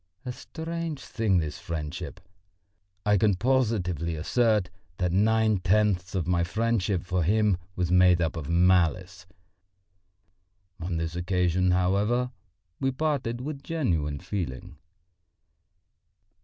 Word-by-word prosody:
A 125 - -3
strange 165 +2 -5
thing, 110 -6 +1
this 80 -3 -2
friendship! 85 +2 -5 0.9
I 105 -1 +4
can 105 -1 +3
positively 95 - 0
assert 105 +3 +1 0.3
that 90 -2 0
nine 110 +2 +3
tenths 95 -1 +1
of 90 -4 0
my 85 -1 +1
friendship 105 -2 0
for 90 0 -1
him 105 +2 +2 0.2
was 90 -1 -1
made 90 -1 +5
up 80 -2 0
of 80 -2 -5
malice. 90 0 +2 1.5
On 85 0 -3
this 80 0 -3
occasion, 90 0 +1
however, 100 +8 +1 0.5
we 135 0 +1
parted 130 -4 -1
with 140 +1 -5
genuine 85 - -1
feeling. 90 -6 -5
95 Hz, 115 wpm, -27 LUFS, 85-110 Hz, 1.5 s, made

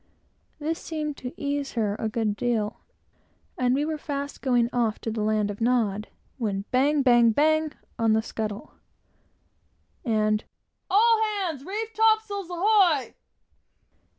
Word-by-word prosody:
This 315 +2 -2
seemed 305 -2 -4
to 250 - -6
ease 285 -1 -2
her 215 -4 0
a 220 - -1
good 215 -2 -1
deal, 220 -3 -1 0.8
and 250 0 +1
we 290 +2 0
were 310 -1 -3
fast 285 -1 -5
going 245 -3 +2
off 230 -3 +1
to 225 - -3
the 220 0 -3
land 210 -1 +1
of 205 - -10
Nod, 220 -4 +1 0.3
when 200 -4 -2
bang, 280 +3 +3
bang, 240 -2 +6
bang 310 +5 +2 0.3
on 225 -1 +3
the 220 0 +2
scuttle, 215 -2 -5 1.3
and 215 -2 +1 0.5
"All 445 +3 +4
hands, 380 -10 -2
reef 435 +6 -4
topsails, 435 -4 +2
ahoy!" 355 -5 +3
260 Hz, 135 wpm, -26 LUFS, 220-320 Hz, 1.3 s, bang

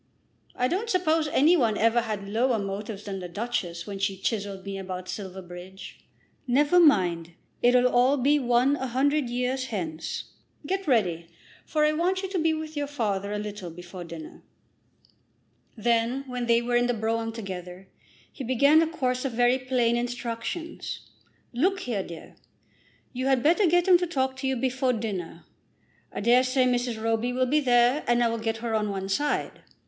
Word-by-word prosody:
I 250 - +1
don't 400 - -2
suppose 325 -6 +2
any 300 +4 +4
one 230 -9 +2
ever 230 +2 +3
had 210 -3 -4
lower 235 +4 +1
motives 200 +1 -5
than 195 -2 -5
the 180 -1 -7
Duchess 175 -4 -3
when 200 -2 -6
she 195 0 -1
chiselled 200 -1 -3
me 195 -1 -5
about 185 -1 -6
Silverbridge. 185 -1 -8 0.5
Never 290 +7 +4
mind; 175 - +3 0.3
it'll 245 +1 +5
all 250 +3 +3
be 285 +3 +3
one 250 +2 +3
a 265 - -3
hundred 275 +2 +1
years 250 +2 -1
hence. 170 -9 -4 0.4
Get 385 +3 -2
ready, 180 - +1 0.4
for 305 -1 +2
I 305 - +3
want 360 +5 0
you 385 - -3
to 375 -2 -1
be 325 0 +2
with 315 0 -4
your 290 -1 -2
father 205 -8 -2
a 210 - -2
little 205 -3 -6
before 175 +2 -9
dinner." 165 -2 -10 1.4
Then, 235 +4 +1
when 250 -2 -4
they 235 0 +3
were 240 0 -1
in 245 0 +3
the 245 - 0
brougham 225 +1 -1
together, 190 -4 -7 0.5
he 270 - -7
began 280 +6 +4
a 330 - +2
course 255 -6 -1
of 270 -3 -2
very 245 +2 +3
plain 250 -2 +1
instructions. 245 +7 -4 0.4
"Look 375 +10 +1
here, 230 - -2
dear; 170 -3 -10 0.8
you 255 +1 -2
had 265 -3 +2
better 350 +6 +4
get 350 +2 +3
him 360 -2 +7
to 355 - -1
talk 265 -5 -1
to 265 +1 -3
you 265 - +1
before 260 +1 0
dinner. 185 -8 -5 0.7
I - - -5
dare 240 +4 +5
say 255 0 +2
Mrs. 245 -2 0
Roby 225 +2 0
will 255 +1 +1
be 290 +4 +2
there, 245 +1 +3
and 240 0 +3
I 235 - +3
will 230 0 -2
get 225 0 -2
her 230 - -1
on 210 -1 0
one 195 -1 -3
side. 290 +10 -1
240 Hz, 180 wpm, -26 LUFS, 200-270 Hz, 1.4 s, him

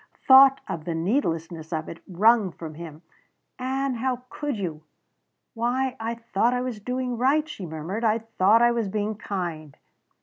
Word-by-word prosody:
Thought 270 0 +8
of 160 -2 -5
the 170 - -2
needlessness 165 - -2
of 160 -1 -3
it 165 - -9
wrung 205 +2 +3
from 160 -1 -9
him: 160 0 -10 0.6
"Ann 265 +1 -1
how 250 +1 -2
could 290 -5 -3
you!" 165 -6 -4 0.7
"Why 250 +3 -1
I 225 +1 -3
thought 230 +1 0
I 250 - -1
was 250 -4 -4
doing 250 +1 -3
right," 290 +5 +2
she 210 - -7
murmured. 165 +8 -5
"I 220 -1 +3
thought 225 0 +3
I 240 - +5
was 230 -3 -1
being 210 +2 -2
kind." 175 -8 -5
225 Hz, 165 wpm, -25 LUFS, 170-250 Hz, 0.7 s, Thought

